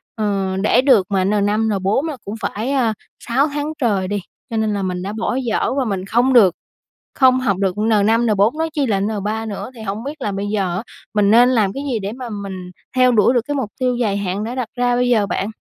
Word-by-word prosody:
Ờ, 195 -3 -1
để 235 +4 +4
được 255 -9 +4
mà 190 -2 +2
N5, 210 +2 +1
N4 200 - 0
là 295 -4 -4
cũng 205 +2 -5
phải, 225 +6 -2
a, 240 -5 +1 0.3
6 265 +5 +1
tháng 295 +1 -3
trời 200 -6 +1
đi, 205 +1 -2 0.3
cho 225 - -3
nên 215 -1 0
là 200 - -2
mình 180 -1 -2
đã 200 +3 -4
bỏ 225 +2 -2
dở 245 -4 0
và 265 - +1
mình 195 -3 -3
không 240 +6 +2
được 195 -8 +6 0.6
không 255 -1 +5
học 200 -7 0
được 190 -2 0
N5, 220 +2 +2
N4, 215 +5 +2
nói 320 0 -1
chi 290 -3 0
là 200 -5 +1
N3 215 +2 -2
nữa. 210 +4 -6
Thì 225 - -10
hổng 210 +2 -4
biết 290 +1 -7
là 205 - -1
bây 195 +1 -3
giờ 195 -4 -1
á, 200 - -4 0.3
mình 205 -1 +3
nên 245 +2 +6
làm 215 -6 +2
cái 275 - -5
gì 220 - 0
để 195 +1 -4
mà 250 -1 -7
mình 190 -3 -6 0.2
theo 255 0 +5
đuổi 230 +1 +4
được 245 - +2
cái 290 - -2
mục 260 -7 -2
tiêu 250 -1 +1
dài 210 -5 0
hạn 200 +1 -2
đã 235 +3 -4
đặt 255 -4 -2
ra 245 0 +1
bây 245 0 +1
giờ 220 -4 +3
bạn? 200 +1 -2
220 Hz, 245 wpm, -19 LUFS, 200-245 Hz, 0.6 s, được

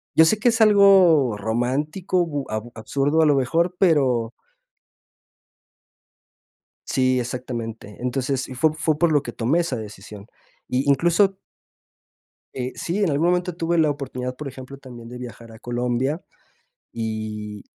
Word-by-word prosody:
yo 160 - +7
sé 215 +7 +3
que 235 +3 +3
es 230 0 0
algo 190 - +6
romántico, 145 - -1
bu 145 -4 -4
ab 110 0 -3
absurdo, 140 +7 0
a - - +5
lo 145 -2 +4
mejor, 165 +7 +1
pero 130 -10 +2 2.6
Sí, 130 -1 +2
exactamente. 120 -4 -5
Entonces, 130 +2 -2
y 130 - -7
fue 150 +5 +2
fue 155 -1 0
por 170 0 +3
lo 145 -2 +3
que 120 - -7
tomé 130 +10 +1
esa 165 -7 -2
decisión. 105 -2 -9 0.4
Y 130 +3 -1
incluso 175 +7 +3 1.2
Eh, 125 0 -3
sí, 185 +5 -2
en 190 - +2
algún 150 +4 +1
momento 180 -1 0
tuve 170 0 0
la 155 -2 +4
oportunidad, 125 -3 -5
por 150 - -7
ejemplo, 130 +1 -9
también 120 -4 -11
de 125 +1 -9
viajar 115 -2 -10
a 110 - -13
Colombia. 125 +6 -2 0.7
Y 110 -2 -5
135 Hz, 145 wpm, -23 LUFS, 120-165 Hz, 2.6 s, yo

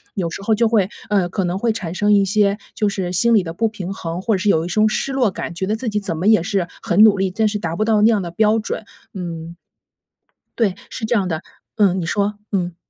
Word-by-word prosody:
有 175 -4 -1
时 180 - -7
候 220 - +2
就 230 +1 +3
会 210 -4 +2 0.2
呃， 190 -4 +2
可 190 0 -1
能 175 +2 -1
会 230 +2 +1
产 180 -5 -5
生 210 +2 +2
一 200 -1 +5
些 200 +1 +2 0.2
就 210 -1 +1
是 185 -3 -3
心 235 +6 +3
理 210 -5 +4
的 165 -1 -6
不 225 +5 0
平 195 -3 -6
衡， 170 0 -5
或 225 - 0
者 - - 0
是 205 - +1
有 160 -2 +2
一 - - -4
种 215 +4 +2
失 270 +5 -2
落 245 -7 +2
感， 170 - -6
觉 190 +2 -2
得 210 - 0
自 240 +1 -5
己 210 -1 -1
怎 170 -5 -3
么 185 - -1
也 215 -6 +5
是 190 -2 -1
很 185 +5 +2
努 210 -2 +5
力， 190 -1 0
但 220 +3 +1
是 210 0 -1
达 165 -4 -3
不 215 - +1
到 215 -2 +3
那 220 - +6
样 210 -3 +1
的 175 - -5
标 210 +5 +2
准。 215 - -4 0.3
嗯。 170 -2 -6 1.0
对， 205 -6 +2 0.2
是 220 - -6
这 230 - 0
样 195 -5 +1
的， 160 -1 -3 0.3
嗯， 190 -3 +3
你 165 - -3
说， 205 +2 0 0.2
嗯。 180 -3 -1
200 Hz, 285 characters per minute, -20 LUFS, 175-215 Hz, 1.0 s, 那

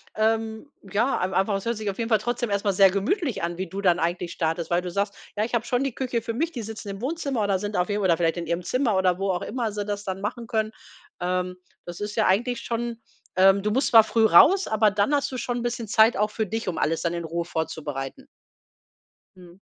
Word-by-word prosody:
ähm, 220 +4 -1 0.2
ja, 235 +7 +1
ei 185 +1 -1
einfach 195 +2 +1
es 195 - -4
hört 235 -1 -1
sich 215 -1 -3
auf 195 - -5
jeden 230 0 -2
Fall 220 - +5
trotzdem 240 0 -2
erst 200 0 -1
mal 200 - +2
sehr 195 +1 +6
gemütlich 235 - -1
an, 170 0 -2
wie 190 - -3
du 195 +4 -5
dann 180 -2 +3
eigentlich 170 +1 -1
startest, 165 0 -2
weil 175 +1 +3
du 180 - -5
sagst: 200 +2 -1 0.2
„Ja, 210 - +2
ich 240 - -8
habe 235 -1 +1
schon 250 +2 0
die 270 -4 -3
Küche 250 -3 -2
für 230 0 -4
mich, 325 +7 -1
die 245 -7 -5
sitzen 215 -1 -7
im 195 +1 -6
Wohnzimmer 280 -3 -2
oder 195 -2 +1
sind 205 +1 -4
auf 180 +2 +1
jeden 205 0 0
oder 170 -3 +3
vielleicht 165 0 +1
in 170 -2 -4
ihrem 170 +1 -1
Zimmer“ 250 0 +1
oder 185 -1 +2
wo 195 -1 0
auch 180 - -2
immer 235 -4 -2
sie 205 -1 -4
das 205 -1 -3
dann 190 0 -4
machen 230 +3 -4
können. 220 -1 -1 0.5
Ähm, 180 0 -1 0.3
das 175 0 -8
ist 210 0 -4
ja 220 - +2
eigentlich 240 +6 +1
schon 235 0 -3 0.4
ähm, 195 +1 +6
du 210 - 0
musst 265 +5 +1
zwar 225 -2 +8
früh 225 0 +2
raus, 350 - +6
aber 215 -1 +3
dann 205 +7 +1
hast 285 -1 +1
du 255 - -4
schon 245 0 -2
'n - - -3
bisschen 240 -2 -3
Zeit 220 +2 +5
auch 210 +1 +1
für 220 -1 -1
dich, 225 +2 -4
um 170 - -4
alles 165 +1 0
dann 170 -1 -1
in 170 -1 -4
Ruhe 170 +1 -2
vorzubereiten. 160 - -5 1.1
Mhm. 180 0 -15
205 Hz, 255 wpm, -25 LUFS, 180-235 Hz, 1.1 s, zwar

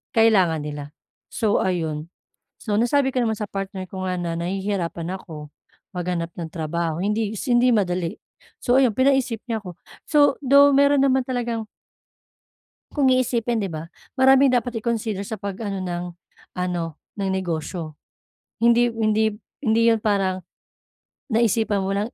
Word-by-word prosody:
kailangan 190 -9 +4
nila. 145 -1 -5 0.5
So 215 -3 +1
ayun, 160 -4 -2 0.5
so 215 - -3
nasabi 265 +3 +2
ko 255 - +1
naman 220 -1 0
sa 210 - -2
partner 195 -1 -5
ko 190 -1 -6
nga 185 - -1
na 170 -1 -2
nahihirapan 180 -1 -3
ako, 150 -4 -10 0.4
maghanap 175 -1 -2
ng 165 -2 -5
trabaho, 165 0 -2
hindi 210 +1 0
si 250 - -1
hindi 245 +1 +4
madali. 180 -5 0 0.5
So 250 +1 +4
ayun, 250 - +4
pinaisip 260 -3 +2
niya 225 -2 -1
ako, 180 -3 -8 0.3
so 290 -3 +4
though 280 +2 +6
meron 280 0 +5
naman 265 -1 +2
talagang 235 -3 -2 1.3
Kung 285 -3 +2
iisipin 240 -3 +1
'di 195 - -3
ba, 160 0 -6 0.3
maraming 265 +1 +6
dapat 245 -2 -1
i-consider 220 -4 -2
sa 215 +2 -6
pag-ano 200 0 -4
ng 175 -1 -3 0.5
ano 175 -3 -2 0.2
ng 195 -2 -2
negosyo. 165 -3 -3 0.7
Hindi 235 +1 +4
hindi 220 -1 +1 0.3
hindi 230 0 +3
'yun 225 -1 +4
parang 190 -3 0 0.9
naisipan 220 -3 +2
mo 190 - -2
lang 205 +4 -2
210 Hz, 145 wpm, -23 LUFS, 180-235 Hz, 1.3 s, though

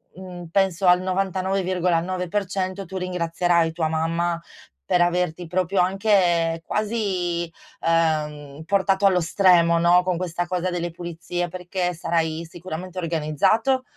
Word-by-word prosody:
mhmm, 180 -1 -9
penso 190 -1 +1
al 180 0 +6
99,9% 185 0 -1
tu 190 +2 -6
ringrazierai 175 -2 +1
tua 160 -1 -1
mamma 165 +2 -1 0.5
per 175 - +3
averti 175 -1 0
proprio 185 +2 0
anche 180 -4 +2
quasi, 190 -6 -1 0.3
ehm, 155 -3 0
portato 195 +1 +2
allo 185 -2 +4
stremo, 170 -1 +4
no, 175 +1 +5
con 180 -1 -1
questa 175 0 -3
cosa 180 0 -1
delle 175 -1 -2
pulizie, 175 +1 -4
perché 180 0 -3
sarai 165 -1 -1
sicuramente 180 +1 -7
organizzato, 185 - +1
175 Hz, 115 wpm, -23 LUFS, 170-185 Hz, 0.5 s, al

